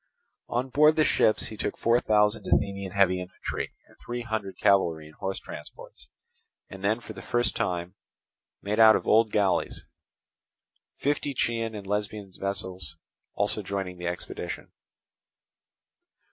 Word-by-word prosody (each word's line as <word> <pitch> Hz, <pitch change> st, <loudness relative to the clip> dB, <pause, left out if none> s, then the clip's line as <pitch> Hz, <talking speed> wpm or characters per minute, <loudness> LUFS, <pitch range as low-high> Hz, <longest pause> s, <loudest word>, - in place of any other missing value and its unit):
On 125 Hz, +2 st, -1 dB
board 150 Hz, +3 st, +5 dB
the 155 Hz, -, +4 dB
ships 110 Hz, -, +3 dB
he 110 Hz, -, -8 dB
took -, -, -2 dB
four 115 Hz, +1 st, +3 dB
thousand 105 Hz, -1 st, +2 dB
Athenian 100 Hz, -2 st, 0 dB
heavy 95 Hz, -2 st, +3 dB
infantry, 90 Hz, 0 st, -5 dB
and -, -, -21 dB
three 120 Hz, 0 st, -5 dB
hundred 110 Hz, -4 st, -3 dB
cavalry 85 Hz, -6 st, +3 dB
in 75 Hz, -, -14 dB
horse 95 Hz, +3 st, -3 dB
transports, -, -, -9 dB, 0.6 s
and 95 Hz, 0 st, -9 dB
then 110 Hz, +3 st, +2 dB
for 115 Hz, -2 st, -9 dB
the 95 Hz, -, -9 dB
first 120 Hz, 0 st, 0 dB
time 90 Hz, -1 st, -2 dB, 0.7 s
made 105 Hz, +2 st, -1 dB
out 110 Hz, -1 st, +9 dB
of -, -, -1 dB
old 110 Hz, 0 st, +5 dB
galleys; 95 Hz, -4 st, +1 dB, 1.1 s
fifty 145 Hz, 0 st, -1 dB
Chian 115 Hz, -2 st, -1 dB
and 100 Hz, -2 st, -7 dB
Lesbian 105 Hz, -1 st, -3 dB
vessels 95 Hz, -5 st, -3 dB, 0.4 s
also 105 Hz, +1 st, 0 dB
joining 95 Hz, -2 st, -4 dB
in -, -, -17 dB
the 90 Hz, -, -3 dB
expedition. 90 Hz, 0 st, -5 dB
100 Hz, 145 wpm, -27 LUFS, 95-115 Hz, 1.1 s, out